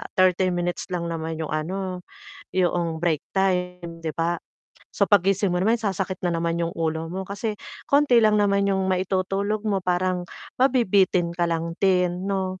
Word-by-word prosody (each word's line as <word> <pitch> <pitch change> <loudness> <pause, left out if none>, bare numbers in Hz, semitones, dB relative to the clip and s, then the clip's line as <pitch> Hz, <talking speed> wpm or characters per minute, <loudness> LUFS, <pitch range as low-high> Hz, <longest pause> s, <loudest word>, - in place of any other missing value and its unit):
30 185 0 +3
minutes 175 0 -2
lang 170 -1 -2
naman 160 0 -3
'yong 160 - -4
ano, 185 +4 -3 0.6
'yoong 175 -3 +1
break 160 -3 0
time 180 -3 -1
'di 160 - -2
ba. 165 +1 +1 0.6
So - - +1
paggising 195 -1 +3
mo 180 - 0
naman 225 +5 +2
sasakit 190 -3 -2
na 175 - +2
naman 165 0 -1
'yong 170 0 -2
ulo 160 0 -2
mo 190 +1 -4
kasi 205 +3 -3 0.3
konti 280 -4 +5
lang 215 -1 +4
naman 200 -1 +2
'yong 190 -1 +1
maitutulog 195 +3 -1
mo 200 -2 +1
parang, 180 0 0 0.4
mabibitin 200 -9 +3
ka 175 0 +1
lang 165 0 -2
din, 180 -1 +2
'no? 190 -1 -2
185 Hz, 160 wpm, -24 LUFS, 170-195 Hz, 0.6 s, konti